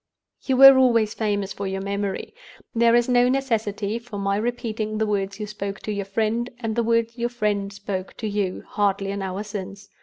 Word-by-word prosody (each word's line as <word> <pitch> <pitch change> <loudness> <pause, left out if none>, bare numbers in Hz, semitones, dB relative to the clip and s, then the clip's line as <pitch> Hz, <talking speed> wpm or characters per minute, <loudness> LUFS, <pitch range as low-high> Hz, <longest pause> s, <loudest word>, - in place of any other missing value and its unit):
"You 260 -2 +1
were 270 0 +10
always 230 -4 +3
famous 205 -3 -1
for 200 - -4
your 190 0 -3
memory. 200 0 -3 0.4
There 235 0 +4
is 240 0 +3
no 245 0 +4
necessity 225 -5 -1
for 230 -3 -9
my 200 0 0
repeating 220 -1 -2
the 220 - +1
words 200 -1 -2
you 210 - -3
spoke 200 -2 -5
to 215 - -4
your 200 -1 -3
friend, 225 +4 -1
and 225 -3 -3
the 235 - +2
words 230 +1 0
your 240 +1 0
friend 210 -4 -1
spoke 200 -2 -5
to 220 - -3
you, 200 -3 -2
hardly 200 -1 0
an 200 0 -4
hour 190 +1 -3
since. 200 -1 -7
210 Hz, 200 wpm, -24 LUFS, 200-230 Hz, 0.4 s, were